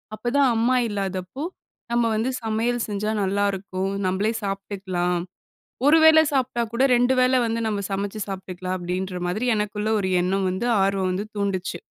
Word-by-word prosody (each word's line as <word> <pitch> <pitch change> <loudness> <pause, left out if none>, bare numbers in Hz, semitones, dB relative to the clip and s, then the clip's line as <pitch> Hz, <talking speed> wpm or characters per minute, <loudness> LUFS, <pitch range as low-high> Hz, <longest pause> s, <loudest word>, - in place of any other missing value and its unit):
அப்பதான் 255 +5 +2
அம்மா 235 +3 +2
இல்லாதப்போ, 195 +4 -4 0.5
நம்ம 235 0 +2
வந்து 225 +4 0
சமையல் 225 +2 0
செஞ்சா 210 +1 -2
நல்லாருக்கும். 195 -1 -1 0.2
நம்பளே 195 +4 +1
சாப்ட்டுக்கலாம். 190 -3 -2 0.7
1 305 +3 +7
வேளை 315 0 +8
சாப்ட்டா 255 -3 0
கூட, 235 +2 +1
2 245 +2 +3
வேளை 255 0 +4
வந்து, 230 0 -1
நம்ம 205 -2 -2
சமைச்சு 200 +2 -3
சாப்பிட்டுக்கலாம் 185 -1 -4
அப்டின்ற 180 +1 -3
மாதிரி 215 +8 -1
எனக்குள்ள 210 0 -2
ஒரு 190 -1 -1
எண்ணம் 190 +1 0
வந்து, 185 +6 -2 0.2
ஆர்வம் 195 -1 +1
வந்து 200 +3 -3
தூண்டுச்சு. 195 -3 -2
200 Hz, 145 wpm, -24 LUFS, 190-235 Hz, 0.7 s, வேளை